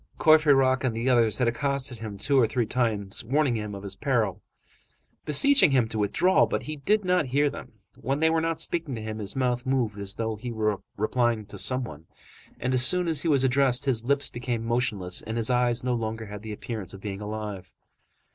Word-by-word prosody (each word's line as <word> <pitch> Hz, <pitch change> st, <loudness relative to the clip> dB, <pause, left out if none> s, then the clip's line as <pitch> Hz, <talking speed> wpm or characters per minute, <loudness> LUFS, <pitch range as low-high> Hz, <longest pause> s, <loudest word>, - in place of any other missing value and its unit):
Courfeyrac 140 Hz, -5 st, +4 dB
and 120 Hz, -4 st, -1 dB
others 120 Hz, -4 st, +3 dB
had 125 Hz, -, +1 dB
accosted 135 Hz, 0 st, 0 dB
him 110 Hz, -2 st, -7 dB
two 135 Hz, +6 st, +2 dB
or 115 Hz, -, +4 dB
three 115 Hz, +1 st, -1 dB
times, 110 Hz, -4 st, -1 dB
warning 135 Hz, +2 st, +1 dB
him 105 Hz, -2 st, -4 dB
of 100 Hz, -, -9 dB
his 100 Hz, -1 st, -6 dB
peril, 115 Hz, -5 st, -1 dB, 0.8 s
beseeching 275 Hz, -, +5 dB
him 130 Hz, -4 st, +2 dB
to 110 Hz, -, -3 dB
withdraw, 140 Hz, -, +3 dB
but -, -, -3 dB
he 155 Hz, -, -5 dB
did 205 Hz, +8 st, +1 dB
not 180 Hz, -5 st, +1 dB
hear 145 Hz, +3 st, +1 dB
them. -, -, -10 dB, 0.2 s
When 135 Hz, +3 st, -3 dB
they 160 Hz, +1 st, +3 dB
were 165 Hz, 0 st, +1 dB
not 165 Hz, 0 st, -2 dB
speaking 165 Hz, -6 st, -2 dB
to 110 Hz, -, -6 dB
him, 110 Hz, 0 st, -5 dB
his 100 Hz, -2 st, -3 dB
mouth 125 Hz, -2 st, 0 dB
moved 125 Hz, -6 st, -1 dB
as 100 Hz, 0 st, -2 dB
though 110 Hz, -1 st, -3 dB
he 120 Hz, +3 st, -6 dB
were 110 Hz, -3 st, -1 dB, 0.2 s
replying 115 Hz, +1 st, 0 dB
to 100 Hz, -, -11 dB
some 130 Hz, 0 st, 0 dB
one, 80 Hz, -7 st, -10 dB, 0.5 s
and 130 Hz, +1 st, -1 dB
as 130 Hz, -1 st, +4 dB
soon 180 Hz, +4 st, +4 dB
as 160 Hz, -3 st, +3 dB
he -, -, -2 dB
was 140 Hz, -4 st, +3 dB
addressed, 130 Hz, 0 st, +2 dB
his 120 Hz, -5 st, 0 dB
lips 140 Hz, +3 st, 0 dB
became 120 Hz, -2 st, -4 dB
motionless 110 Hz, -7 st, 0 dB
and 110 Hz, +1 st, -5 dB
his 115 Hz, +2 st, +1 dB
eyes 125 Hz, -1 st, +1 dB
no 125 Hz, -1 st, 0 dB
longer 110 Hz, -1 st, -3 dB
had 105 Hz, 0 st, -9 dB
the 110 Hz, 0 st, -7 dB
appearance 105 Hz, -2 st, -6 dB
of -, -, -11 dB
being 100 Hz, -1 st, -6 dB
alive. 105 Hz, -3 st, -6 dB
120 Hz, 215 wpm, -26 LUFS, 110-135 Hz, 0.8 s, beseeching